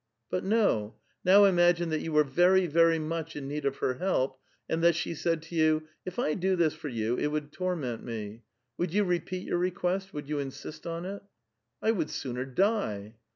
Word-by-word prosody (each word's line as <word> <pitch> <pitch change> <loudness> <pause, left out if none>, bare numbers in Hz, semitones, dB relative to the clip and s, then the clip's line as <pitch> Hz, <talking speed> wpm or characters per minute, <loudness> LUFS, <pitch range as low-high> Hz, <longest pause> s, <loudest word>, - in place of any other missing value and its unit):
" 115 -1 -53
"But 185 - -1
no; 190 - +1 0.3
now 195 +3 +7
imagine 175 -2 +4
that 155 -1 0
you 165 - -4
were 150 0 +5
very, 180 +6 +4
very 165 0 +4
much 160 +1 -4
in 140 -2 -5
need 145 0 -4
of 135 - -2
her 125 0 -1
help, 135 -8 0 0.3
and 165 +1 -1
that 170 0 +5
she - - -2
said 165 0 -1
to 165 +1 -9
you, 155 -1 +3
' - - -47
If 180 - -5
I 150 - +1
do 190 0 +1
this 170 -4 +2
for 155 -1 -7
you, 115 0 -1
it - - +1
would 150 -1 -3
torment 160 -10 -3
me,' 110 -2 -6 0.4
would 175 +1 -1
you 210 - +4
repeat 180 0 -2
your 175 - 0
request, 185 +2 -1
would 150 -4 -6
vou 150 +1 -2
insist 140 +4 -7
on 170 +1 -4
it? 200 +2 -5 0.2
" 110 -1 -54
" 120 +1 -54
I 220 - +4
would 170 -9 -1
sooner 125 -1 -4
die." 130 - 0
160 Hz, 220 wpm, -29 LUFS, 135-180 Hz, 0.4 s, now